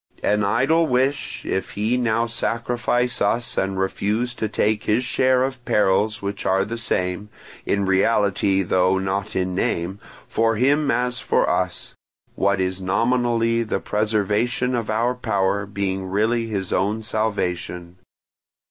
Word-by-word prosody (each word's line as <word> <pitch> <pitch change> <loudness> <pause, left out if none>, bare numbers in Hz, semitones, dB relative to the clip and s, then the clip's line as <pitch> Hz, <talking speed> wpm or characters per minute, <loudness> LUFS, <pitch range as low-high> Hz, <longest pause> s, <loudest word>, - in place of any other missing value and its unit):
An 105 0 +2
idle 155 +11 +2
wish, 130 +2 -1
if 95 - -2
he 110 +4 0
now 115 -2 +1
sacrifice 120 +1 -1
us 115 +4 0
and 95 0 -1
refuse 105 +5 -1
to 110 -3 -3
take 105 0 0
his 110 +4 +2
share 130 0 +2
of 130 -2 -4
perils 105 +1 +1
which 100 0 -4
are 95 +1 +2
the 115 +2 -5
same, 90 -1 -2 0.4
in 100 -1 +1
reality 95 0 +2
though 95 +1 +2
not 95 +2 -2
in 95 0 -1
name, 90 +1 -1 0.3
for 115 0 +1
him 140 +5 +2
as 125 0 0
for - - +1
us; - - -2 0.4
what 100 -1 +1
is 95 0 -2
nominally 115 +3 +1
the 115 - -2
preservation 110 +4 0
of 115 -3 -2
our 115 +3 +1
power 100 -4 -1
being 95 -1 -3
really 110 +4 0
his 100 -4 -3
own 105 +3 0
salvation. 90 -5 -2
105 Hz, 140 wpm, -22 LUFS, 95-120 Hz, 0.4 s, An